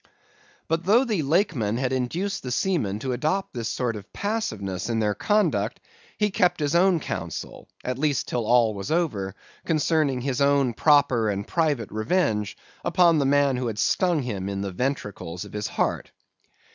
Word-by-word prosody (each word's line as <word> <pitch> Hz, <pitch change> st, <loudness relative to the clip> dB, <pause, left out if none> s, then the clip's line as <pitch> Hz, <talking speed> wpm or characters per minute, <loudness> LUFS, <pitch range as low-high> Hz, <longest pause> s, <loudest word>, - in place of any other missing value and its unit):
"But 165 Hz, +1 st, 0 dB
though 230 Hz, +7 st, +5 dB
the 215 Hz, -9 st, 0 dB
Lakeman 140 Hz, -, +1 dB
had 130 Hz, 0 st, -1 dB
induced 165 Hz, +11 st, -2 dB
the 125 Hz, -, -6 dB
seamen 125 Hz, -, 0 dB
to 130 Hz, -, -2 dB
adopt 155 Hz, +10 st, -1 dB
this 115 Hz, -2 st, -3 dB
sort 120 Hz, -3 st, -1 dB
of 105 Hz, -, -10 dB
passiveness 110 Hz, -, -3 dB
in 115 Hz, -, 0 dB
their 105 Hz, -2 st, +1 dB
conduct, 135 Hz, -, +1 dB, 0.4 s
he 210 Hz, -1 st, +1 dB
kept 180 Hz, -4 st, +2 dB
his 145 Hz, 0 st, 0 dB
own 175 Hz, 0 st, +4 dB
counsel -, -, -6 dB
(at 125 Hz, 0 st, -3 dB
least 145 Hz, -2 st, 0 dB
till 120 Hz, -3 st, -2 dB
all 120 Hz, -2 st, +4 dB
was 100 Hz, -1 st, -6 dB
over) 110 Hz, -, -1 dB, 0.3 s
concerning 155 Hz, -5 st, +1 dB
his 135 Hz, 0 st, -2 dB
own 140 Hz, -3 st, +3 dB
proper 135 Hz, -5 st, +3 dB
and 100 Hz, 0 st, -3 dB
private 150 Hz, -, 0 dB
revenge 110 Hz, -, 0 dB, 0.3 s
upon 170 Hz, -2 st, +4 dB
the 140 Hz, -, +2 dB
man 140 Hz, -2 st, +3 dB
who 125 Hz, -1 st, -2 dB
had 110 Hz, -2 st, -4 dB
stung 175 Hz, -, +2 dB
him 100 Hz, -5 st, -3 dB
in 100 Hz, 0 st, -3 dB
the 100 Hz, -1 st, -3 dB
ventricles 100 Hz, -7 st, -3 dB
of -, -, -13 dB
his 105 Hz, 0 st, -2 dB
heart. -, -, -1 dB
135 Hz, 170 wpm, -25 LUFS, 110-165 Hz, 0.4 s, though